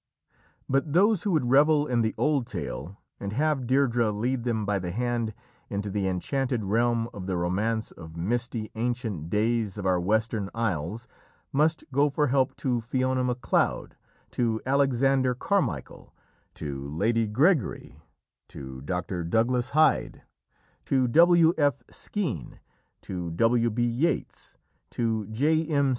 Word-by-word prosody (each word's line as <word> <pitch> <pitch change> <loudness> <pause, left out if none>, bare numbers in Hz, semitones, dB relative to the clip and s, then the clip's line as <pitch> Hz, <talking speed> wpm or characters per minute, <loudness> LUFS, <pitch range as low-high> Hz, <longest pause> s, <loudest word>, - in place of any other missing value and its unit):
But 140 +2 0
those 200 +2 +4
who 205 - 0
would 125 -6 +1
revel 145 +2 +5
in 125 -5 +1
the 110 -1 -1
old 145 -5 +1
tale 85 +10 -6 0.2
and 100 0 -4
have 145 -1 0
Deirdrê 120 -4 +2
lead 120 +4 -2
them 110 -3 -1
by 100 -1 0
the 90 -1 -4
hand 120 +2 -1 0.4
into 100 0 -3
the 100 -1 -1
enchanted 125 +6 -1
realm 115 +3 +1
of 95 -4 -7
the 95 -2 -1
romance 105 +6 -1
of 80 -1 -11
misty, 115 +4 -2
ancient 115 - -3
days 110 0 0
of 100 - -5
our 90 -1 +2
Western 110 +1 0
Isles 110 +1 -2 0.5
must 155 +4 +2
go 140 +2 +3
for 145 0 0
help 130 0 +1
to 125 -3 -1
Fiona 130 +2 0
Macleod, 125 -3 0 0.4
to 115 -2 0
Alexander 135 -1 +2
Carmichael, 130 - -2 0.4
to 70 -2 -5
Lady 110 +9 +1
Gregory, 140 - +1 0.5
to 65 -1 -9
Dr. 90 +3 -3
Douglas 120 +7 +1
Hyde, 155 +2 +2 0.6
to 130 -2 +2
W. 170 +3 +6
F. 145 -1 +2
Skene, 155 - -4 0.4
to 90 -2 -5
W. 115 +7 +2
B. 120 +2 -1
Yeats, 120 +8 -2 0.3
to 110 -3 -1
J. 150 +9 +1
M. 140 -3 +2
120 Hz, 140 wpm, -27 LUFS, 100-135 Hz, 0.6 s, W